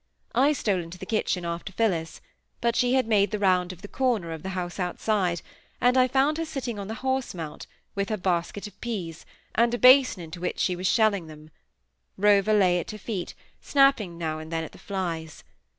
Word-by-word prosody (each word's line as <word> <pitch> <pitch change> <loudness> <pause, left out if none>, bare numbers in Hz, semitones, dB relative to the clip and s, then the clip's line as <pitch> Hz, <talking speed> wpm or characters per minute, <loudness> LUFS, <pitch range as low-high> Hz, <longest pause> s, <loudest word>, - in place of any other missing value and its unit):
I 275 +5 +4
stole 200 -9 0
into 170 +2 -9
the 190 - -8
kitchen 185 -4 -1
after 170 +2 -4
Phillis; 180 -6 -1 0.4
but 235 0 +1
she 245 +1 +3
had 260 - +3
made 205 -3 +3
the 215 - -2
round 185 -3 +2
of 185 +1 -13
the - - -6
corner 225 -9 0
of 160 -1 -6
the 190 - -5
house 175 +1 -4
outside, 180 -1 0 0.4
and 245 +1 +3
I 255 -1 +5
found 275 +5 +2
her 330 - -1
sitting 260 -8 -4
on 200 - -5
the 220 - -4
horse 260 -5 -1
mount, 160 -3 -7 0.3
with 200 -1 -2
her 215 - -1
basket 180 +2 -1
of 205 -2 -12
peas, 185 -9 -5 0.3
and 235 +1 +3
a - - -2
basin 255 -6 +6
into 165 +2 -9
which 180 - -2
she 180 - +1
was 185 +1 -2
shelling 205 -7 +2
them. 155 0 -13 0.7
Rover 205 +1 +4
lay 180 -3 +4
at - - -6
her 215 - -6
feet, 200 -3 -5 0.3
snapping 275 - +3
now 160 -2 -3
and 155 +1 -9
then 165 0 -1
at - - -8
the - - -15
flies. 170 -5 -4
195 Hz, 210 wpm, -26 LUFS, 175-235 Hz, 0.7 s, basin